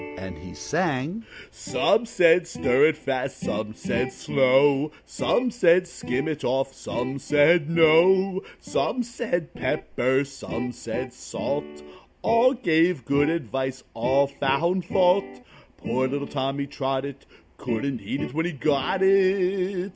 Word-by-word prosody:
And 95 0 -7
he 90 -1 -11
sang: 155 - -2 0.3
"Some 230 +1 0
said, 170 -4 +4
'Stir 135 -3 +2
it 155 -1 0
fast,' 135 -2 -3
Some 110 0 -4
said, 125 +4 -2
'Slow'; 135 +3 +2
Some 245 0 0
said, 180 -6 +4
'Skim 135 -4 -3
it 155 -2 -4
off,' 135 +2 0
Some 130 +1 -4
said, 150 +3 +3
'No'; 180 +4 +4 0.2
Some 250 - -1
said, 220 -8 -4
'Pepper,' 130 +2 -1
Some 125 -3 -6
said, - - -6
'Salt'; 75 0 -5 0.4
All 230 +3 +4
gave 170 - +1
good 145 +2 +2
advice, 135 -4 -3
All 130 +5 +2
found 140 +6 0
fault. 180 -9 +1 0.3
Poor 130 +2 -1
little 140 +2 -3
Tommy 140 0 -3
Trottett! 135 0 -4 0.3
Couldn't 120 +2 -3
eat 140 - -4
it - - -5
when 160 +3 -1
he 175 - -4
got 145 +6 0
it." 190 -1 +2
145 Hz, 130 wpm, -24 LUFS, 130-180 Hz, 0.4 s, said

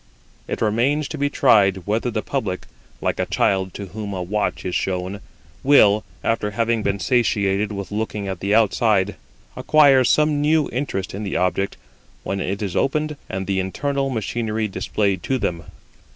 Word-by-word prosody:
It - - -4
remains 130 +8 +1
to 155 - -5
be 145 0 +1
tried 100 - +3
whether 110 +4 0
the 110 -2 -2
public 105 -10 -3 0.4
(like - - -1
a - - 0
child 95 -1 +1
to 100 - -5
whom 100 +1 -6
a 90 -1 -3
watch 105 +4 -2
is 90 - -2
shown) 95 +2 -2 0.4
will, 110 -7 +5 0.2
after 110 -2 0
having 115 +2 0
been 100 -1 0
satiated 105 -3 +1
with 100 -2 -6
looking 105 -1 -3
at 95 -2 -4
the 100 +3 +1
outside, 105 -2 +3 0.4
acquire 140 -4 +5
some 150 +3 +3
new 150 0 +3
interest 120 -7 -3
in 100 - -5
the 100 -3 -2
object 95 +2 0 0.5
when 100 - -3
it 100 +2 -2
is 95 -4 -3
opened 150 +2 0
and 95 0 -3
the 95 0 0
internal 140 +9 -1
machinery 110 -2 -2
displayed 100 -1 -1
to 135 - 0
them. 85 -8 -3
105 Hz, 165 wpm, -22 LUFS, 95-125 Hz, 0.5 s, will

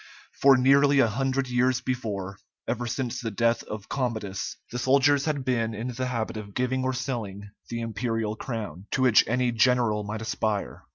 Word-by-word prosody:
For 135 -1 +7
nearly 140 +2 +5
a 135 - +6
hundred 135 +4 -1
years 125 0 +2
before, 105 -7 -4 0.3
ever 120 0 -2
since 125 0 -3
the 115 - -2
death 115 +2 +1
of 105 -1 -7
Commodus, 110 -8 -3
the 125 - -3
soldiers 140 +2 +3
had 145 -4 -1
been 115 -3 0
in 115 +4 -4
the 130 +1 -3
habit 115 -3 -3
of 100 -2 -8
giving 130 +1 0
or 130 0 0
selling 110 -6 -4 0.2
the 115 0 -3
imperial 115 -1 -2
crown, 105 - -6
to 130 - +1
which 125 -4 +6
any 125 +1 +1
general 115 -2 +2
might 105 +2 -5
aspire. 110 -2 -2
120 Hz, 175 wpm, -26 LUFS, 110-130 Hz, 0.3 s, For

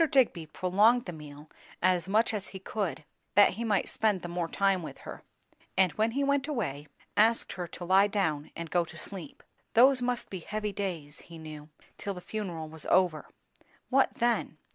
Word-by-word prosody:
Digby 230 - +2
prolonged 205 +9 +3
the 180 - -5
meal 150 -1 -11 0.3
as 185 -1 +2
much 220 +3 +3
as 205 -2 -3
he 190 - -8
could, 185 -7 -3 0.3
that 205 +1 +8
he 225 +5 -4
might 210 -4 +1
spend 210 -4 0
the - - -4
more 175 -1 -2
time 195 +1 +1
with 160 - -8
her; - - -9 0.6
and 185 -2 +4
when 220 +1 0
he 280 +2 0
went 280 0 +1
away, 160 - -3 0.3
asked 225 +2 +3
her 180 -2 -5
to 175 - -8
lie 190 +3 +5
down 160 -8 -1
and 170 -1 -6
go 175 -1 +3
to 165 0 -11
sleep. 165 -2 -6 0.3
Those 255 +2 +6
must 245 -1 -2
be 190 - -4
heavy 210 +3 -4
days, 170 -8 -4
he 165 - -9
knew, 155 -1 -9 0.3
till 200 -2 -3
the - - -6
funeral 180 -5 -5
was 160 0 -6
over. 180 -4 +2 0.6
What 270 +1 +3
then? 235 -9 0
190 Hz, 185 wpm, -29 LUFS, 165-220 Hz, 0.6 s, that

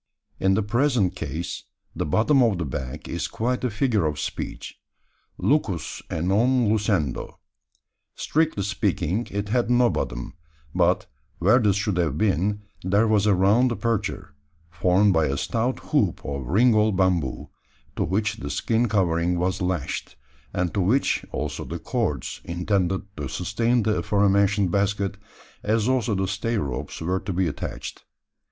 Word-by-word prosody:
In 95 0 +3
the 110 - +1
present 120 -3 +1
case, 85 +2 -5 0.3
the - - -2
"bottom 125 - +3
of 115 -6 +3
the 85 - -2
bag" 65 -2 -5
is - - -2
quite 125 +3 -2
a 125 - +1
figure 105 - +1
of 75 -1 -3
speech - - -5 0.6
lucus 105 - 0
a 80 - -2
non 115 +6 +3
lucendo. 100 - 0 0.8
Strictly 155 -10 0
speaking, 100 0 -1
it 100 0 -3
had 120 +1 +1
no 120 -1 +4
bottom; - - -3 0.4
but, - - +2 0.3
where 105 +8 +4
this 105 -5 +3
should 105 -2 -1
have 80 -5 0
been, 100 +2 +1 0.2
there 100 +5 +3
was 105 -1 +3
a 100 - +5
round 105 +7 +4
aperture, 115 -9 -2 0.4
formed 95 +4 +3
by 80 -2 +3
a 70 +1 -1
stout 120 - -1
hoop - - +2
of 70 -3 -4
ringall 110 - +4
bamboo, 90 -7 0 0.4
to - - 0
which 105 +3 0
the - - -6
skin 115 +1 +1
covering 90 -3 +1
was 90 +2 -1
lashed, 90 -3 -2 0.4
and 90 -2 -1
to 100 - +1
which, 115 +10 +2
also, - - -3
the - - -5
cords - - -2
intended 90 +2 0
to 75 -2 -3
sustain 115 +5 0
the 110 0 +1
afore 100 -1 +2
mentioned 100 -1 +3
basket, 100 0 0 0.4
as 110 +1 +1
also 125 -4 +1
the 95 0 0
stay 105 +5 -1
ropes, 70 - -4
were 90 +3 0
to 95 +1 -5
be 90 0 +1
attached. 75 - -6
100 Hz, 155 wpm, -24 LUFS, 90-110 Hz, 0.8 s, a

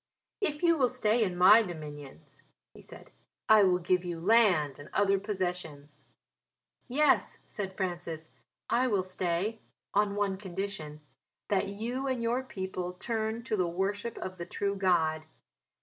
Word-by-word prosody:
"If 300 -5 -1
you 335 -2 +4
will 255 -2 +4
stay 235 -2 +2
in 180 -4 -2
my 195 +5 +8
dominions," 150 - -9 0.3
he - - -14
said, - - -14 0.4
"I 220 -1 +7
will 185 -2 +4
give 180 +1 +1
you 175 -2 -4
land 180 - +3
and 145 - -11
other 195 -1 +3
possessions." 175 -8 -4 0.9
"Yes," 295 +4 +2
said 190 -3 -5
Francis, 170 -4 -4 0.4
"I 255 +2 +2
will 200 -6 +1
stay 185 +3 -2 0.3
on 205 0 +2
one 200 -2 0
condition 190 -5 -5 0.5
that 200 -1 +1
you 235 +7 -3
and 255 -3 -1
your 240 +3 +1
people 190 -7 -5
turn 220 +3 -3
to 225 - -1
the 185 -4 +1
worship 200 +6 -2
of 185 -1 -6
the 170 - -4
true 200 +3 -1
God. 160 -5 +1
190 Hz, 150 wpm, -30 LUFS, 175-220 Hz, 0.9 s, my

